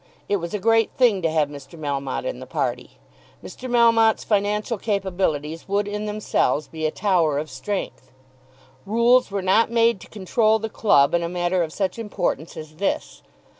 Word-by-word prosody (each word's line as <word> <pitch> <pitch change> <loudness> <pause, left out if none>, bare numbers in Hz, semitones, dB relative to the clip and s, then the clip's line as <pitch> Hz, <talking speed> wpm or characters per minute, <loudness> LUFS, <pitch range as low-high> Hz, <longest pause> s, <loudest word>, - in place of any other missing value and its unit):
It 205 - +1
was 170 +2 -5
a - - -2
great 225 +1 +3
thing 230 -7 +3
to 165 - +1
have 155 -2 +1
Mr. 145 +3 -11
Melmotte 140 - -3
in - - -4
the - - -9
party. - - -3 0.5
Mr. 255 - -8
Melmotte's 230 -2 +4
financial 210 +2 0
capabilities 180 -7 -2
would 200 +1 0
in 210 +1 -4
themselves 180 -9 0
be 160 -1 -3
a - - 0
tower 170 -8 +1
of 150 0 -4
strength. 130 -2 -5 0.8
Rules 235 +4 +3
were 200 -1 -3
not 195 +5 +3
made 230 -2 +2
to - - -12
control 215 +2 +1
the 220 0 -5
club 140 -11 +3
in 170 - +2
a 170 - -2
matter 175 +1 0
of 160 -2 -2
such 190 +4 -2
importance 180 -7 -3
as 155 0 -10
this. 195 +2 -2
195 Hz, 175 wpm, -23 LUFS, 160-220 Hz, 0.8 s, Melmotte's